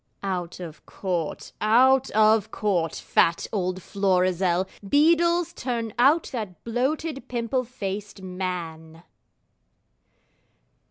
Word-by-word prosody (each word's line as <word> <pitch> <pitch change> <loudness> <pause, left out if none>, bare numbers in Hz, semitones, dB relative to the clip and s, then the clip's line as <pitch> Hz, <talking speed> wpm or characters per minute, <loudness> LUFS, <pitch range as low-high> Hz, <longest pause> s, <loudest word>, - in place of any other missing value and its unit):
Out 180 -3 -3
of 165 -4 -9
Court, 175 -5 -4
out 260 +5 +4
of 215 0 +3
Court, 175 -7 -1
fat 170 0 +1
old 185 -2 -2
Florizel! 185 -2 +1 0.2
Beadles, 335 - +3
turn 235 - -3
out 290 +7 +5
that 215 -8 -6
bloated, 270 +5 -2
pimple 245 +1 -1
faced 205 -4 -6
man! 170 -3 -5
205 Hz, 95 wpm, -25 LUFS, 180-255 Hz, 0.2 s, out